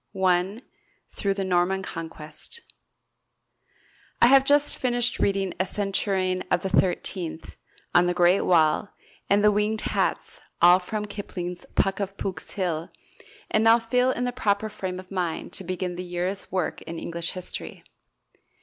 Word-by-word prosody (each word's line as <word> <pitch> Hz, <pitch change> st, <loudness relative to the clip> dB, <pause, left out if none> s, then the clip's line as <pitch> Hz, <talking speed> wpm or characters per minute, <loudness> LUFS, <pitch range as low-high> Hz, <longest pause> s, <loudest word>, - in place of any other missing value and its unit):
I. 190 Hz, +5 st, +1 dB, 0.5 s
Through 200 Hz, -1 st, -1 dB
the 195 Hz, -1 st, -2 dB
Norman 185 Hz, +1 st, +1 dB
Conquest 165 Hz, -, -8 dB, 1.6 s
I -, -, +7 dB
have 265 Hz, +2 st, +7 dB
just 290 Hz, +1 st, +3 dB
finished 245 Hz, -1 st, +1 dB
reading 195 Hz, -2 st, +1 dB
"A 185 Hz, -, +2 dB
Centurion 190 Hz, -2 st, 0 dB
of 175 Hz, -, +1 dB
the 190 Hz, -, -1 dB
Thirtieth," 180 Hz, -3 st, -1 dB, 0.3 s
"On 175 Hz, 0 st, +5 dB
the 180 Hz, -, +1 dB
Great 180 Hz, +2 st, +4 dB
Wall," 165 Hz, +3 st, +3 dB, 0.4 s
and 205 Hz, +1 st, +4 dB
"The 210 Hz, -, +6 dB
Winged 210 Hz, +1 st, 0 dB
Hats" -, -, -2 dB, 0.2 s
all 175 Hz, +1 st, +7 dB
from 210 Hz, +3 st, -4 dB
Kipling's 180 Hz, -4 st, -6 dB
"Puck 195 Hz, +1 st, +1 dB
of 200 Hz, 0 st, -4 dB
Pook's 185 Hz, -4 st, -5 dB
Hill" 170 Hz, -4 st, -2 dB, 0.6 s
and 220 Hz, +1 st, +3 dB
I -, -, +9 dB
now -, -, +6 dB
feel 250 Hz, +2 st, +1 dB
in 245 Hz, -1 st, -1 dB
the 250 Hz, -, 0 dB
proper 215 Hz, -3 st, 0 dB
frame 190 Hz, -3 st, -5 dB
of 185 Hz, +1 st, -12 dB
mind 180 Hz, -4 st, -3 dB
to -, -, -4 dB
begin 180 Hz, 0 st, -3 dB
the 180 Hz, -, -4 dB
year's 180 Hz, +2 st, -4 dB
work 185 Hz, -3 st, -2 dB
in 170 Hz, -, -7 dB
English 170 Hz, 0 st, -4 dB
History. 185 Hz, -1 st, -6 dB
190 Hz, 155 wpm, -25 LUFS, 180-210 Hz, 1.6 s, I